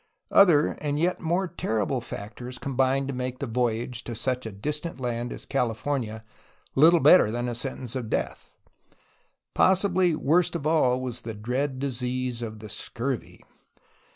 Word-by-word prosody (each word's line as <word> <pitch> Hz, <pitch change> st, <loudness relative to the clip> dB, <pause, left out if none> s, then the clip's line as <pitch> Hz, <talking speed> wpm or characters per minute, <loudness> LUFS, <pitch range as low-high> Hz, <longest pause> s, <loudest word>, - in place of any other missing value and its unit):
Other 170 Hz, -7 st, +6 dB
and 145 Hz, -1 st, -1 dB
yet 175 Hz, +4 st, +1 dB
more 175 Hz, +3 st, 0 dB
terrible 125 Hz, -, -1 dB
factors 120 Hz, +3 st, -7 dB
combined 135 Hz, 0 st, 0 dB
to 140 Hz, -, -3 dB
make 125 Hz, 0 st, -3 dB
the 140 Hz, -, -3 dB
voyage 120 Hz, 0 st, -1 dB
to 120 Hz, -, -5 dB
such 125 Hz, +1 st, -2 dB
a -, -, -6 dB
distant 150 Hz, -, -4 dB
land 120 Hz, -1 st, -3 dB
as -, -, -7 dB
California 115 Hz, -2 st, -2 dB, 0.5 s
Httle 160 Hz, +4 st, +6 dB
better 180 Hz, -12 st, +7 dB
than 120 Hz, +2 st, -2 dB
a 120 Hz, -, -2 dB
sentence 125 Hz, 0 st, -4 dB
to 130 Hz, -, -2 dB
death. 110 Hz, -, -3 dB, 1.0 s
Possibly 185 Hz, -2 st, +3 dB
worst 165 Hz, +4 st, +2 dB
of 140 Hz, -, -4 dB
all 150 Hz, -6 st, +3 dB
was 120 Hz, -2 st, -4 dB
the 115 Hz, -1 st, -6 dB
dread 130 Hz, +6 st, -2 dB
disease 125 Hz, -2 st, -2 dB
of 110 Hz, -2 st, -5 dB
the 110 Hz, -, -9 dB
scurvy. 120 Hz, +5 st, -4 dB
130 Hz, 155 wpm, -26 LUFS, 120-145 Hz, 1.0 s, better